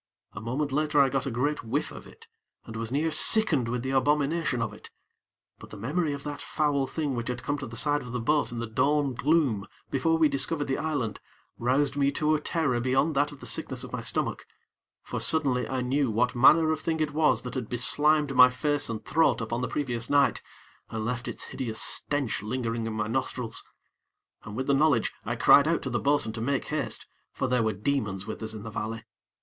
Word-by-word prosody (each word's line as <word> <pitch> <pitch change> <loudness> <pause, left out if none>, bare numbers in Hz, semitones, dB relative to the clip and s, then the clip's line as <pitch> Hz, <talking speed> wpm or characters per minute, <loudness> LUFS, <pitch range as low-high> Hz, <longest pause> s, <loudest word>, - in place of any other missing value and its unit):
A - - -7
moment 135 +6 -2
later 150 +1 +1
I 135 -1 +5
got 135 +1 -1
a - - 0
great 135 +5 -1
whiff 140 +7 -2
of - - -10
it, 455 - -16 0.4
and 115 - -9
was 115 +1 -4
near 155 +4 0
sickened 155 - +4
with 125 0 -2
the 130 - -2
abomination 145 0 +1
of 115 - -2
it; - - -12 0.7
but - - -12
the 105 - -10
memory 150 - -1
of 140 0 -5
that 145 -1 -6
foul 145 -3 0
thing 145 0 -2
which 120 -1 -3
had 125 0 -4
come 145 +3 -1
to 135 - -6
the 115 +1 -8
side 145 +3 +2
of 125 - -9
the 125 - -2
boat 150 +3 +1
in 120 - -6
the 120 - -2
dawn 140 +5 +1
gloom, 125 -5 +1 0.2
before 165 +5 +2
we 160 -1 +5
discovered 145 +2 0
the 135 - -2
island, 145 -9 -2 0.4
roused 135 +4 +1
me 140 0 +2
to 155 +2 +1
a 155 - +2
terror 150 -7 0
beyond 135 +5 +1
that 145 +1 +2
of 145 - -13
the - - -8
sickness - - -2
of - - -9
my - - -3
stomach; - - -3 0.6
for, - - -4
suddenly, 135 -6 +2
I 130 -1 -1
knew 135 +1 +1
what 120 +3 +1
manner 155 +6 +5
of 155 - -1
thing 160 -1 -1
it 155 -2 -1
was 155 0 +2
that 125 - -6
had 125 -5 -4
beslimed 145 +4 +2
my 125 -1 +8
face 145 +2 -1
and 110 -2 -5
throat 160 +3 +2
upon 115 +1 -3
the 125 - -1
previous 120 -5 -3
night, 145 -1 +3 0.5
and 110 -1 -4
left 120 +1 -3
its - - -4
hideous 115 -5 -4
stench 140 -9 0
lingering 115 0 -3
in 110 - -3
my 110 -1 -1
nostrils. 115 0 -2 0.8
And 105 - -7
with 130 +2 -2
the 140 - +2
knowledge, 140 -5 +2
I 115 +2 -2
cried 140 +4 +6
out 165 - 0
to 130 - -3
the 120 - 0
bo'sun 140 -6 +1
to 110 - -5
make 135 +3 -1
haste, 150 -2 -3 0.3
for - - -2
there 125 -1 +2
were 110 -1 0
demons 105 -4 -2
with 110 - -6
us 110 0 -4
in 105 - -8
the 115 - -7
valley. 110 +2 -4
135 Hz, 220 wpm, -27 LUFS, 115-145 Hz, 0.8 s, my